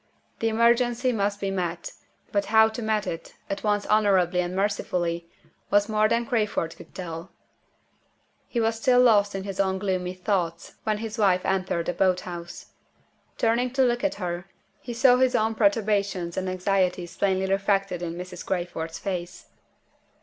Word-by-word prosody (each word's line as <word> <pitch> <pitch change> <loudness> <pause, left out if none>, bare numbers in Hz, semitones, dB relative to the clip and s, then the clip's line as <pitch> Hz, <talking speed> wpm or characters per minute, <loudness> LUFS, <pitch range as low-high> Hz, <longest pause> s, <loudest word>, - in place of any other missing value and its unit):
The 225 - +1
emergency 240 +2 +3
must 205 -2 -1
be 195 -1 -2
met; 185 - -3 0.4
but 200 -1 +1
how 220 0 +5
to 230 +2 -6
meet 215 -1 0
it 165 0 -6 0.2
at 195 - -3
once 205 -1 +1
honorably 190 -4 +3
and 175 +1 -4
mercifully 175 -4 -1 0.4
was 205 0 +3
more 215 -1 +2
than 235 +1 +1
Crayford 210 -8 -1
could - - -15
tell. 170 -1 -6 1.2
He 240 - -2
was 225 0 +1
still 250 0 +4
lost 205 -5 +4
in 195 - -3
his 195 -1 -6
own 190 -1 +1
gloomy 185 -2 -2
thoughts 180 -3 -2
when 215 -1 +1
his 220 0 -6
wife 185 -3 +3
entered 185 -3 0
the 175 - -1
boat 185 -1 +2
house. 175 -1 -8 0.7
Turning 235 +2 +2
to 265 0 +3
look 240 0 +1
at 295 - +1
her, 180 -1 -4 0.3
he 245 - -7
saw 250 +1 +5
his 255 -1 +3
own 220 -1 +2
perturbations 205 - +1
and 185 0 -2
anxieties 185 -1 0
plainly 190 -1 +1
reflected 195 -2 0
in 170 -1 -4
Mrs. 180 0 -7
Crayford's 165 -3 -3
face. 180 -1 -5
195 Hz, 165 wpm, -25 LUFS, 180-220 Hz, 1.2 s, how